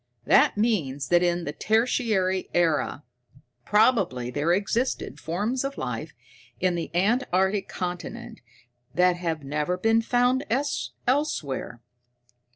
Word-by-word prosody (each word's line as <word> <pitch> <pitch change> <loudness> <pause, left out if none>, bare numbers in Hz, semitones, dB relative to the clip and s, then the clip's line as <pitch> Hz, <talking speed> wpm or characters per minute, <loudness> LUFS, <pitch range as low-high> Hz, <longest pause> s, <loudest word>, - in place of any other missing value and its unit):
"That - - +4
means 155 - 0
that 175 0 +5
in 175 -1 +1
the 145 - -4
Tertiary 215 -4 +1
Era, 165 -3 +1 0.6
probably, 200 - +2
there 145 +5 0
existed 205 +7 -1
forms 210 +11 -2
of 275 0 -4
life - - -5 0.4
in 185 -1 +1
the 170 -1 -3
antarctic 195 -1 +1
continent 180 -2 -6 0.5
that 180 0 +3
have 165 -4 -3
never 150 +6 -1
been 225 +4 +3
found 245 +3 +2 0.6
elsewhere. 205 - -1
185 Hz, 110 wpm, -25 LUFS, 165-225 Hz, 0.6 s, that